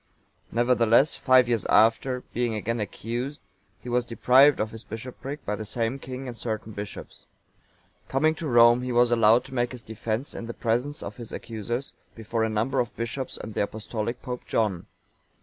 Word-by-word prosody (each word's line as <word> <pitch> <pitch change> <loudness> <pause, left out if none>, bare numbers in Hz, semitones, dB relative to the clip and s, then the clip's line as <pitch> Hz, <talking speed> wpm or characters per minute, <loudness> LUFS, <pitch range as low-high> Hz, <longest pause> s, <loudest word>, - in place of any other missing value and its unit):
(919) - - -12 0.3
Nevertheless, 135 +6 +5
five 130 -2 +5
years 120 -3 +1
after, 115 +4 +3
being 120 -2 0
again 115 +2 -2
accused, 120 +7 -4 0.4
he - - -10
was 125 0 +1
deprived 130 +4 +5
of 110 0 -1
his 110 0 -9
bishopric 130 +6 -7
by 105 - -1
the 110 - -5
same 115 +4 -2
king 130 0 -7
and 120 - -6
certain 110 -1 -4
bishops.(920) 100 0 -12
Coming 155 +4 +3
to 160 0 -5
Rome,(921) 120 -1 +6
he 125 - -2
was 120 0 +4
allowed 115 0 +5
to - - -12
make 120 -1 0
his 120 -2 -9
defence 110 +4 -4
in 115 - -6
the 120 - -6
presence 125 +6 -1
of 100 +1 -7
his 120 -2 -8
accusers, 120 +4 -4 0.2
before 115 0 -2
a 110 - +1
number 110 +4 0
of 120 - -1
bishops 115 +3 -4
and 110 - -7
the - - 0
Apostolic 110 +3 -4
Pope 125 -2 -4
John. 105 -6 0
120 Hz, 185 wpm, -26 LUFS, 110-125 Hz, 0.4 s, Rome,(921